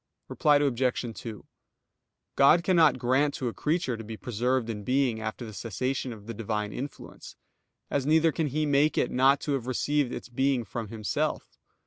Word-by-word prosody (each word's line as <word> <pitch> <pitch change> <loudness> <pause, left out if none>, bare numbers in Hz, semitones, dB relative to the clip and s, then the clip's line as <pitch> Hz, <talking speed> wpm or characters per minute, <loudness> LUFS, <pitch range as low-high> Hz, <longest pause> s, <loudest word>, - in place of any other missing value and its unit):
Reply 150 -1 +3
Obj. 125 -4 0
2: 110 +2 -8 0.9
God 155 +5 +5
cannot 170 -4 +4
grant 135 +4 +1
to 125 - -2
a - - -7
creature 150 -5 -1
to 115 - -8
be 110 0 -7
preserved 120 +2 -1
in 105 -3 -5
being 125 -2 +1
after 110 +2 -5
the 110 - -9
cessation 125 +5 -3
of 105 -3 -10
the 115 - -6
Divine 105 -1 -3
influence: 140 +3 -8 0.6
as 140 -1 0
neither 160 +1 +4
can 160 0 -1
He 155 +3 -1
make 145 +1 +2
it - - +1
not 135 +2 +4
to 150 - -3
have 130 -3 -2
received 140 +1 0
its - - -6
being 130 0 0
from 110 +2 -5
Himself. 110 -2 -3
130 Hz, 175 wpm, -28 LUFS, 115-145 Hz, 0.9 s, God